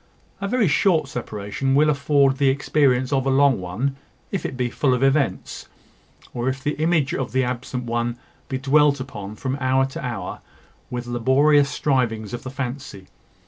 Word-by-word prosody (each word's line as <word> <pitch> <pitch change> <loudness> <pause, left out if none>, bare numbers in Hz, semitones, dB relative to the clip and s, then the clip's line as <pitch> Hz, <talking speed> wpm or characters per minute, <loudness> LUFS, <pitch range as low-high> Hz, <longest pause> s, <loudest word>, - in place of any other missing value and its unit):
A 200 - -1
very 230 -1 +2
short 155 -1 +2
separation 115 +2 -3
will 150 +2 +5
afford 140 -1 +2
the 140 -1 +3
experience 135 -1 +2
of 135 -1 +1
a - - +3
long 135 -2 +4
one, 115 +10 -3 0.3
if 195 - -2
it 130 - -8
be 125 -1 0
full 130 -1 +1
of 125 - -1
events, 135 +1 0 0.7
or 120 +1 -1
if 135 +1 -4
the 150 - 0
image 160 -4 +2
of 130 -4 -3
the 130 0 +2
absent 125 0 -3
one 120 0 -2 0.3
be 130 - -1
dwelt 140 +1 +3
upon, 105 -6 -7
from 130 +3 -3
hour 130 0 +2
to 135 +1 -7
hour, 115 -8 -5 0.5
with 120 0 -4
laborious 140 +4 +3
strivings 120 -8 -1
of 120 - -4
the 130 - -7
fancy. 130 -6 -6
130 Hz, 175 wpm, -22 LUFS, 120-140 Hz, 0.7 s, will